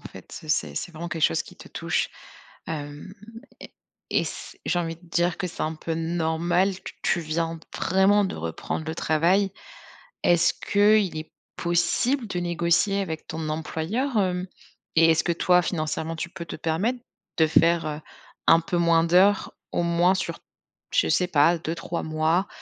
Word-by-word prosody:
fait, - - -10
heu, - - -11
c'est 75 - 0
c'est 175 - -4
vraiment 170 +2 -6
quelque 165 -2 -4
chose 80 - +3
qui - - -15
te - - -13
touche, - - -1 0.6
hem 150 +3 -6 0.5
et - - -11 0.4
et - - +2
c - - -8
j'ai 175 - +1
envie 165 -1 -3
de 175 +1 -21
dire 175 0 +1
que 180 - -1
c'est 175 - -5
un 155 +1 -1
peu 165 +1 -5
normal, 170 +3 +1
que - - -8
tu 175 - +1
viens 165 +1 -2
d - - -14 0.2
vraiment 195 +3 +3
de - - -3
reprendre 85 - -4
le 160 - -3
travail. 180 +6 +2 0.7
Est-ce 175 0 +4
qu'il 205 -4 +3
est 155 - -7 0.3
possible 180 +9 +1
de 180 -2 -3
négocier 175 +3 +1
avec 160 -4 -5
ton 160 -1 -4
employeur, 190 - -2
hem 185 -2 0 0.5
et 165 0 +6
est-ce 160 - +2
que 170 - +2
toi 180 +1 +4
financièrement, 160 -1 -2
tu 165 +1 -4
peux 170 -2 -8
te - - -6
permettre 185 +11 -1 0.4
de 160 - +5
faire, 165 +1 +3
heu, 150 0 -4 0.5
un 165 +1 +7
peu 175 +2 -2
moins 170 -1 +4
d'heures, 190 +4 +4 0.2
au 175 - +1
moins 170 +2 +3
sur, - - -3 0.5
je - - +3
sais 180 - +2
pas, 165 +1 +4
2-3 165 +1 -4
mois 160 +4 +1
170 Hz, 175 wpm, -25 LUFS, 160-180 Hz, 0.7 s, un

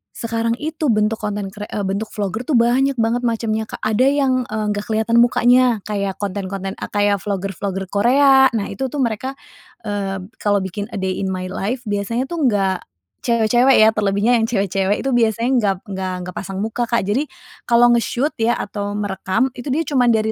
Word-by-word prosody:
sekarang 230 0 -1
itu 310 -1 -2
bentuk 215 -1 +1
konten 205 -2 -3
kre 210 +1 -8
eee, 205 - -3
bentuk 200 +3 -2
vlogger 210 +3 -3
itu, 300 - +1
banyak 255 +4 +3
banget 230 +2 +1
macamnya 220 -1 -1
Kak. - - -9
Ada 215 +4 +2
yang, 275 -2 +2 0.2
eee, 215 0 -2
nggak 205 0 -4
kelihatan 220 +1 +1
mukanya, 245 -2 +3
kayak 200 -2 -2
konten-konten, 195 -1 -4
a - - -4
kayak 205 -1 +1
vlogger 195 0 -3
vlogger 190 +2 -3
Korea. 265 +5 +5
Nah 215 - 0
itu 265 0 -3
tuh 290 - -6
mereka, 250 +4 -2 0.5
eee, 195 -3 -3 0.2
kalau 205 -2 +1
bikin 200 +3 -5
a - - -8
day 190 -1 -2
in 195 - -2
my 185 -1 -4
life 240 +7 -3
biasanya 210 +4 -2
tuh 340 -2 -2
nggak 195 -4 +1 0.5
cewek-cewek 240 +3 +4
ya, 215 - +7
terlebihnya 215 +3 +2
yang 225 - +1
cewek-cewek 195 -2 0
itu 270 - 0
biasanya 230 0 +2
nggak 200 -3 +1 0.2
nggak 190 -1 -3
nggak 180 - -8
pasang 195 +1 -4
muka 230 +2 -2
Kak. 235 -3 +1
Jadi 225 +10 0 0.4
kalau 240 0 +5
nge-shoot 240 +5 +1
ya 230 +1 +2
atau 205 0 -4
merekam 205 +4 -1
itu 245 +3 -9
dia 290 +5 0
cuman 255 -5 +1
dari 220 0 0
215 Hz, 190 wpm, -19 LUFS, 200-240 Hz, 0.5 s, ya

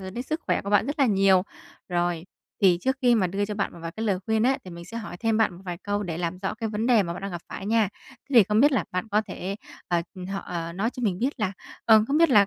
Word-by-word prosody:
rồi 190 0 -6
đến 240 +5 -4
sức 310 +5 -3
khỏe - - +1
của 200 - -5
bạn 205 +2 +4
rất 285 +2 -3
là 275 - +5
nhiều. 195 -3 +4 0.5
Rồi, 175 -1 -1 0.4
thì 180 -3 +5
trước 265 +4 0
khi 245 -1 +5
mà 195 -5 +3
đưa 195 +3 -1
cho 210 0 -4
bạn 205 - -2
một - - -12
vài 165 - -4
cái 220 0 -4
lời 190 -3 +1
khuyên 220 0 +2
á, 265 +2 +3
thì 180 - -9
mình 170 0 -9
sẽ 230 +6 -8
hỏi 215 -5 -6
thêm 225 -1 +1
bạn 220 -5 +2
một 185 - -13
vài 175 -2 -5
câu 205 0 -1
để 170 -4 -4
làm 175 +1 -2
rõ 190 +1 -3
cái 225 0 -3
vấn 215 +2 -2
đề 240 -4 +5
mà 170 -2 -3
bạn 175 - -8
đang 195 - -3
gặp 175 -2 -5
phải 195 - -6
nha. 220 -2 +3 0.2
Thế 280 - -10
thì 230 - +9
không 210 +3 +2
biết 290 +2 +5
là 265 - +1
bạn 185 +5 -2
có 210 +1 +2
thể 195 +2 -4 0.3
ờ, 175 -1 +1 0.3
họ 195 0 -2
ờ, 170 -1 -5
nói 200 +7 -1
cho - - -7
mình 190 -5 0
biết 260 0 -2
là 195 -2 0 0.3
ờ, 220 -1 +6
không 290 +3 +2
biết 335 -2 +5
là, 205 -5 +6
205 Hz, 310 wpm, -26 LUFS, 180-225 Hz, 0.5 s, thì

